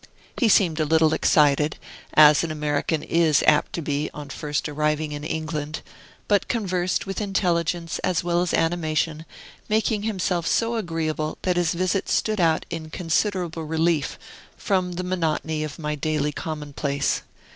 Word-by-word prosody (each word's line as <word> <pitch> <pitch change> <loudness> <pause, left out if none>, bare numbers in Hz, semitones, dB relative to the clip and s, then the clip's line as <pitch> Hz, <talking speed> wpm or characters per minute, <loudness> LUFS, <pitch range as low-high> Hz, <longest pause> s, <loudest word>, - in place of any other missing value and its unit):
He 235 - +2
seemed 170 -6 +4
a - - +3
little 160 0 +3
excited, 150 0 +3 0.4
as 150 0 +7
an 165 - -2
American 150 0 -1
is 165 -3 +3
apt 150 - +4
to 170 - -3
be 145 +1 -1
on 145 -2 -8
first 145 +1 -3
arriving 150 +1 -1
in 145 0 -6
England, 155 -1 -4 0.5
but 205 -1 +2
conversed 185 -6 -1
with 195 +1 -4
intelligence 175 -4 0
as 185 -1 0
well 175 0 +1
as 180 - 0
animation, 160 -1 0 0.4
making 215 0 +1
himself 185 -5 -1
so 230 +1 +1
agreeable 160 -6 -2
that 180 -1 +1
his 175 -1 +1
visit 185 +2 0
stood 215 -3 +1
out 160 -2 +2
in 160 -2 -5
considerable 170 0 -1
relief 160 -1 0 0.4
from 185 -3 0
the 180 +1 -4
monotony 160 -3 -1
of 150 -1 -6
my 150 -2 -3
daily 150 0 -1
commonplace. 145 -2 -2
160 Hz, 150 wpm, -24 LUFS, 150-180 Hz, 0.5 s, as